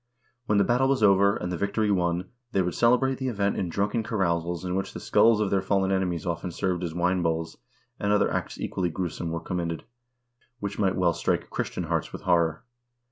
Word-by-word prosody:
When 105 - +3
the 100 - +5
battle 125 +4 +2
was 135 -4 +1
over, 100 0 +5
and 90 - -4
the 90 - -2
victory 105 +1 0
won, 90 -1 0 0.2
they 95 - +3
would 90 - -2
celebrate 125 +3 +3
the 130 - -2
event 100 -4 0
in 90 - -2
drunken 105 +6 0
carousals 85 -5 -1
in 90 - -2
which 95 +1 -2
the - - -6
skulls 115 -1 +4
of 105 -3 0
their 95 - +2
fallen 95 0 +1
enemies 90 -4 -1
often 85 +1 -2
served 90 0 -2
as 85 -2 -4
wine 90 +1 +1
bowls, 80 -1 -1 0.4
and 105 - 0
other 105 - +2
acts - - -3
equally 90 -2 -1
gruesome 85 0 -3
were 85 0 -2
com 90 +2 -4
mitted, 85 -2 -3 0.8
which 100 -1 -4
might 95 -2 +2
well 90 -2 +2
strike - - -1
Christian - - -3
hearts - - -2
with - - -8
horror. 85 -3 +2
95 Hz, 210 wpm, -26 LUFS, 85-100 Hz, 0.8 s, the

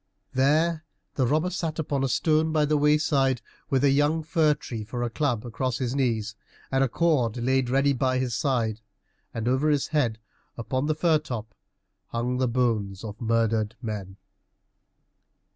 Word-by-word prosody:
There 155 +5 +2 0.3
the 130 -3 +1
robber 155 +7 +1
sat 165 -3 -3
upon 145 -4 -1
a 135 - +1
stone 155 +3 +2
by 155 -1 +2
the 150 +1 +1
wayside, 145 -3 +2 0.3
with 135 0 +1
a 140 - +5
young 145 +3 +2
fir 155 -1 +2
tree 115 -6 -6
for 120 +3 -4
a 120 - -2
club 125 -5 -1
across 120 +1 -2
his 125 -2 -2
knees, 115 -5 0 0.4
and 135 0 +3
a 135 - +1
cord 130 -7 +1
laid 130 +1 +1
ready 135 +2 +3
by 130 0 +1
his 130 -2 -1
side, 115 -5 0 0.5
and 115 0 -4
over 130 +5 +2
his 145 -2 +1
head, 125 -9 +1 0.4
upon 130 +4 -2
the 155 - +1
fir 160 -1 +3
top, 115 -8 -6 0.5
hung 125 +2 -2
the 130 - +2
bones 115 -5 0
of 110 +2 -8
murdered 115 -1 +1
men. 100 -4 -6
130 Hz, 165 wpm, -26 LUFS, 115-150 Hz, 0.5 s, a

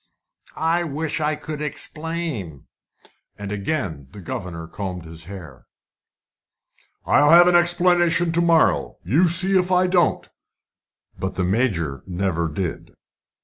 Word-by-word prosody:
"I 165 +2 +1
wish 155 0 -3
I 150 0 0
could 150 -1 -7
explain." 150 - -5 0.7
And 100 -1 -6
again 100 - -3
the 105 - -10
governor 85 -2 -6
combed 90 -2 -6
his 80 0 -9
hair. 80 -9 -11 1.4
"I'll 145 0 +4
have 175 +2 +8
an 180 - +4
explanation 175 -1 +3
to 170 +1 +1
morrow! 165 -2 +2
you 150 - +3
see 185 +3 +3
if 185 0 +2
I 180 0 +4
don't!" 180 -1 +1 0.9
But 95 0 -3
the 90 - -1
Major 90 - -1
never 90 -2 -1
did. 85 +2 -5
145 Hz, 125 wpm, -22 LUFS, -, 1.4 s, have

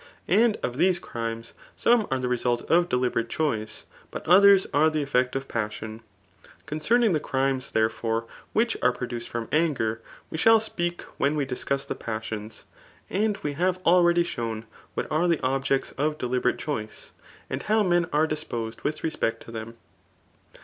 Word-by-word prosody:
And 225 0 +4
of 125 0 -2
these 180 +3 +3
crimes, 115 -6 -5 0.2
some 235 -3 +3
are 130 - +1
the 130 -1 -2
resuh 120 -1 0
of 175 +1 +4
deliberate 125 -2 0
choice, 110 -9 -2 0.2
but - - -7
others 195 +2 +7
are 155 +2 +5
the 155 -1 -1
effect 125 -2 +1
of 135 0 -3
passion. 110 0 -4 0.6
Concerning 210 +8 +2
die 155 - +2
crimes 135 -2 -1
therefore 115 +1 0 0.3
which 230 +1 +2
are 125 - +4
produced 120 -1 -5
from 120 -1 -3
aAger, 140 -9 +1 0.3
we 160 - -4
shall 225 +4 +6
speak 175 -5 -3 0.2
when 145 +2 +2
we 145 -2 0
discuss 135 +1 -2
the - - -3
passions. 110 -1 -6 0.5
And 210 +1 +1
we 145 - -1
have 180 +4 +1
already 175 0 +5
shown 115 -8 -4 0.3
what - - -1
aVe 165 +3 +2
the - - -17
objects 135 +1 0
of 150 +1 +1
deliberate 125 -1 0
choice^ 110 -8 -5 0.4
and 130 +1 -3
how 215 0 +2
men 175 -3 +2
are 150 +2 +3
disposed 120 -8 -4
with 155 +1 -3
respect 115 -8 -1
to - - -11
them. 115 +1 -7
135 Hz, 165 wpm, -26 LUFS, 115-175 Hz, 0.6 s, others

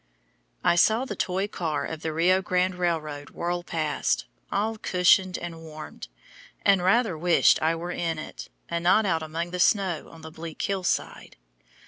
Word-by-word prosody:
I 175 - +3
saw 220 +8 +4
the 210 - -5
toy 190 +2 -1
car 165 -7 -2
of 160 -1 -6
the 160 - -2
Rio 180 +4 +3
Grande 185 0 +1
Railroad 155 -5 -2
whirl 175 +1 -3
past, 160 -3 -1 0.3
all 220 +2 0
cushioned 185 0 +3
and 165 -1 -7
warm, 155 -1 -10 0.7
and 195 -2 +5
rather 195 +1 +3
wished 170 +2 +4
I 160 +1 +2
were 175 +2 -5
in 165 -2 -2
it, 155 - -8 0.2
and 170 0 -3
not 200 +5 +4
out 165 -4 +1
among 165 +2 -4
the 180 - -4
snow 185 -4 +2
on 165 - -14
the 160 0 -9
bleak 160 0 -8
hill 195 -2 -1
side. - - -2
175 Hz, 170 wpm, -26 LUFS, 160-185 Hz, 0.7 s, and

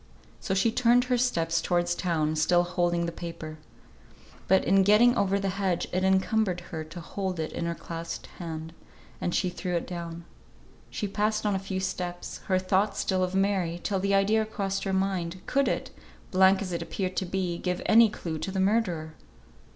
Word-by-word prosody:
So 190 - -2
she 210 +4 +3
turned 245 +1 +4
her 250 0 +1
steps 165 -10 +1
towards 175 -1 +1
town, 160 -4 0
still 175 +3 +3
holding 175 -1 0
the 170 - -2
paper. 165 -2 -7 0.9
But 190 +1 +4
in 195 0 +5
getting 215 +5 +5
over 195 0 +2
the 195 -1 -1
hedge 185 -3 0
it 185 +1 +1
encumbered 190 0 +2
her 160 -2 -3
to 160 +3 -9
hold 185 +1 -4
it 155 - -2
in 170 - -2
her 170 - -2
clasped 165 0 -6
hand, 160 -2 -6 0.5
and 175 - -1
she 185 -3 +1
threw 180 0 -3
it 170 - -1
down. 170 -1 -6 0.6
She 205 - -3
passed 215 +2 0
on 205 - +2
a 190 - 0
few 190 -1 -4
steps, 180 -2 -4
her 185 - +3
thoughts 190 +2 +1
still 185 -1 +1
of 185 +1 -2
Mary, 190 -4 +1
till 195 -2 0
the 200 +1 +1
idea 210 +3 +3
crossed 200 -3 -3
her 195 - -1
mind, 190 -2 -1
could 275 -1 +1
it - - -2 0.4
(blank 190 +1 +5
as 185 - -5
it 170 - -2
appeared 185 -2 -3
to 190 - 0
be) 180 -2 -2
give 180 -1 -2
any 225 0 +7
clue 165 -6 -5
to - - -3
the 190 - -2
murderer? 190 -6 +1
185 Hz, 190 wpm, -27 LUFS, 170-200 Hz, 0.9 s, any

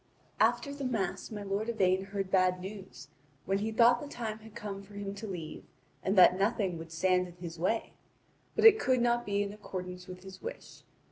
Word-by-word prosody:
After 280 -2 +2
the 285 -1 -6
Mass 220 -8 -2
my 210 -2 -6
lord 200 +3 -2
Yvain 190 -4 +2
heard 195 -1 -4
bad 185 -1 +3
news, 190 -6 -9 0.4
when 195 +1 +1
he 220 +2 -2
thought 240 +2 +5
the 295 - -6
time 225 -6 -5
had 220 -1 -14
come 200 -1 -5
for 200 +1 -15
him 200 -1 -4
to 200 +2 -7
leave 170 -5 -6 0.4
and 195 +1 0
that 185 0 +7
nothing 195 -4 0
would 165 0 -9
stand 180 +2 +2
in 175 - -13
his 170 -2 -8
way; 205 +6 0 0.6
but - - +2
it 440 -1 +9
could 255 - +2
not 240 -1 +1
be 200 0 +1
in 200 0 -5
accordance 180 -3 -7
with 180 0 -9
his 190 0 -11
wish. 480 +2 -8
200 Hz, 205 wpm, -31 LUFS, 185-220 Hz, 0.6 s, it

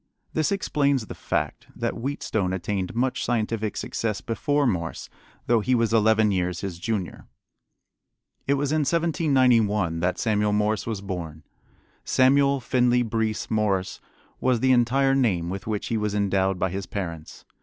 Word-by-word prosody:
This 155 +2 +1
explains 140 - +1
the - - -8
fact - - -3
that - - -2
Wheatstone 110 -7 -2
attained 95 +2 -3
much 125 +2 0
scientific 110 -2 -1
success 110 -3 -2
before 145 +5 0
Morse, 85 -9 -2 0.4
though 120 -1 +3
he 130 +4 +1
was 115 -1 +1
eleven 110 -1 +4
years 90 -2 -1
his 95 -4 -5
junior. 100 -1 -4 1.2
It 140 - +3
was 140 0 -1
in 155 - +2
1791 130 - +2
that 90 +2 0
Samuel 105 -1 +1
Morse 105 +1 0
was 110 -4 -3
born. 85 -6 -6 0.6
Samuel 140 +1 +3
Finley 125 -1 +2
Breese 110 -1 -2
Morse 100 -4 0 0.4
was 125 -2 +2
the 130 +2 +3
entire 130 +2 +3
name 95 -11 +1
with 95 +2 -6
which 105 -2 -2
he 115 - 0
was 105 -1 -1
endowed 95 -2 +1
by 95 0 -1
his 95 0 -4
parents. 85 -6 -6
110 Hz, 150 wpm, -25 LUFS, 95-130 Hz, 1.2 s, eleven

